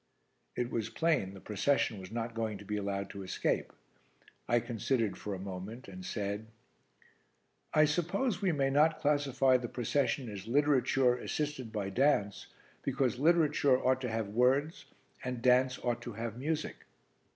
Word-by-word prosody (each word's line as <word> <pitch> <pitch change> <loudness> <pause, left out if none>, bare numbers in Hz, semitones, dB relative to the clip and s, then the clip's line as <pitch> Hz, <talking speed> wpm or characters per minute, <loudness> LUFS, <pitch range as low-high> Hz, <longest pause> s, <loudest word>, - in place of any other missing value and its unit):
It 120 0 -2
was 115 -1 -2
plain 130 - 0
the - - -10
procession 105 +2 0
was 95 +1 -10
not 115 0 -3
going 110 -2 -2
to 100 - -12
be 105 - -3
allowed 100 -1 -3
to 100 - -7
escape. 95 - -1 0.8
I 120 +2 +3
considered 115 -1 -1
for 105 -2 -5
a - - -7
moment 95 +6 -7
and 185 0 -9
said 105 - -3 1.2
"I 155 0 +5
suppose 175 - 0
we 190 -3 +2
may 135 -3 +1
not 155 +3 +4
classify 140 -3 +3
the 125 -1 -4
procession 135 +1 0
as 100 -1 -7
literature 135 -1 +3
assisted 135 -2 -3
by 100 -3 -3
dance, 105 -5 +1 0.3
because 130 -2 0
literature 150 -4 +4
ought 130 0 +2
to 125 - -2
have 110 -2 -2
words 130 - +1 0.4
and 125 -1 -3
dance 130 0 +4
ought 120 -1 -1
to 120 - -6
have 115 0 -4
music." 150 +5 -2
125 Hz, 155 wpm, -32 LUFS, 105-145 Hz, 1.2 s, I